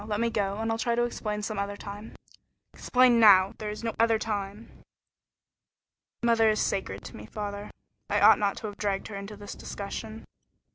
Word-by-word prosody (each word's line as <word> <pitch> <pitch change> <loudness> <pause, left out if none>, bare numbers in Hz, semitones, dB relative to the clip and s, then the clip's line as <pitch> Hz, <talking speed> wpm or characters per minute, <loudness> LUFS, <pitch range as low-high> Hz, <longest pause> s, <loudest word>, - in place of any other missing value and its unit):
Let 210 -1 -2
me 235 0 +1
go, 200 -2 -1
and 225 +1 -1
I'll 225 - -2
try 235 0 +1
to 240 - +2
explain 210 -3 -3
some 215 -1 -3
other 200 0 -3
time." 205 +2 -9 0.6
"Explain 250 -2 +3
now. 195 -3 +7
There 215 - -4
is 210 +2 -7
no 225 -1 -2
other 230 -1 +4
time." 210 0 -4 1.5
"Mother 230 -2 +4
is 215 - +1
sacred 100 - -2
to - - -9
me, 105 - -10
father. 205 - -6 0.4
I - - +2
ought - - +7
not 200 -1 0
to - - -7
have 205 -1 -6
dragged 200 -1 -2
her 205 - -7
into 200 +1 -7
this 205 0 -8
discussion." 220 +2 -7
210 Hz, 190 wpm, -28 LUFS, 200-225 Hz, 1.5 s, now